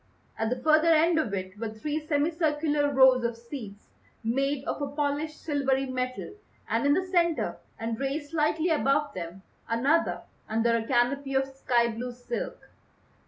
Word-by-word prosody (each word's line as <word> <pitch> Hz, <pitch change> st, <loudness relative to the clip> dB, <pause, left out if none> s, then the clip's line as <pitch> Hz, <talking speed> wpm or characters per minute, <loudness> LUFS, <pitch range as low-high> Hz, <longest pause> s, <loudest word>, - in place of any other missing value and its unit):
At 225 Hz, 0 st, -1 dB
the 250 Hz, -, 0 dB
further 310 Hz, +5 st, +3 dB
end 325 Hz, +1 st, +5 dB
of 240 Hz, -10 st, -1 dB
it 185 Hz, +1 st, -6 dB
were 225 Hz, -1 st, -2 dB
three 290 Hz, +8 st, -3 dB
semi 295 Hz, +1 st, +2 dB
circular 295 Hz, -3 st, +1 dB
rows 260 Hz, -2 st, +6 dB
of 235 Hz, -1 st, -1 dB
seats 230 Hz, -4 st, -9 dB, 0.4 s
made 270 Hz, +4 st, 0 dB
of 290 Hz, -, -3 dB
a 285 Hz, -, -1 dB
polished 295 Hz, +2 st, -2 dB
silvery 270 Hz, -3 st, 0 dB
metal, 255 Hz, +2 st, -3 dB, 0.3 s
and 230 Hz, +5 st, +1 dB
in 285 Hz, -, +5 dB
the 375 Hz, -, 0 dB
centre 345 Hz, -3 st, +1 dB, 0.2 s
and 225 Hz, 0 st, -3 dB
raised 290 Hz, +2 st, -3 dB
slightly 315 Hz, +1 st, +1 dB
above 295 Hz, -2 st, +2 dB
them 180 Hz, +1 st, -7 dB, 0.3 s
another 270 Hz, +9 st, +1 dB, 0.3 s
under 225 Hz, +1 st, +2 dB
a 225 Hz, -1 st, -2 dB
canopy 270 Hz, +2 st, +1 dB
of 270 Hz, 0 st, +2 dB
sky 240 Hz, -3 st, +2 dB
blue 240 Hz, +2 st, -5 dB
silk. 480 Hz, -, -5 dB
275 Hz, 165 wpm, -28 LUFS, 235-305 Hz, 0.4 s, rows